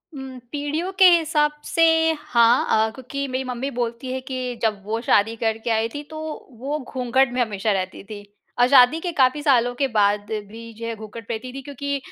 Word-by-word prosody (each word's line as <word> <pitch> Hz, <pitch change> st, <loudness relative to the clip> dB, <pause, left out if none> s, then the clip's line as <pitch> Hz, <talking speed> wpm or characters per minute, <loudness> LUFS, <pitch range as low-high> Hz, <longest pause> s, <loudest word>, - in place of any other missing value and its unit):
हुँ, 265 Hz, -1 st, -8 dB
पीढ़ियों 300 Hz, +5 st, -2 dB
के 380 Hz, -, +8 dB
हिसाब 315 Hz, -3 st, +3 dB
से, 330 Hz, -, +1 dB, 0.4 s
हाँ 235 Hz, -1 st, +3 dB
अ, 220 Hz, 0 st, +3 dB
क्योंकि 275 Hz, +2 st, -5 dB
मेरी 260 Hz, 0 st, -2 dB
मम्मी 255 Hz, +1 st, -4 dB
बोलती 240 Hz, +1 st, -3 dB
है 260 Hz, -, -3 dB
कि 255 Hz, -1 st, -4 dB
जब 215 Hz, -3 st, 0 dB
वो 220 Hz, +2 st, -2 dB
शादी 225 Hz, -1 st, +2 dB
करके 225 Hz, 0 st, -2 dB
आई 225 Hz, 0 st, +1 dB
थी, 290 Hz, -, -4 dB
तो 310 Hz, +1 st, -9 dB, 0.4 s
वो 285 Hz, +4 st, -3 dB
घूँघट 255 Hz, -1 st, 0 dB
में 250 Hz, -, 0 dB
हमेशा 215 Hz, -2 st, -1 dB
रहती 190 Hz, -1 st, -3 dB
थी। 205 Hz, 0 st, -9 dB, 0.4 s
और 245 Hz, -, +6 dB
शादी 260 Hz, +3 st, +6 dB
के 350 Hz, +1 st, -3 dB
काफ़ी 260 Hz, +3 st, +4 dB
सालों 245 Hz, -4 st, +3 dB
के 275 Hz, +2 st, +1 dB
बाद 205 Hz, -3 st, +1 dB, 0.2 s
भी 230 Hz, +2 st, -10 dB
जो 230 Hz, -, -6 dB
है 230 Hz, -, -3 dB
घूँघट 220 Hz, 0 st, -10 dB
पहनती 235 Hz, +2 st, -5 dB
थी 270 Hz, -, -6 dB
क्योंकि 280 Hz, +1 st, -4 dB
250 Hz, 200 wpm, -22 LUFS, 225-275 Hz, 0.4 s, के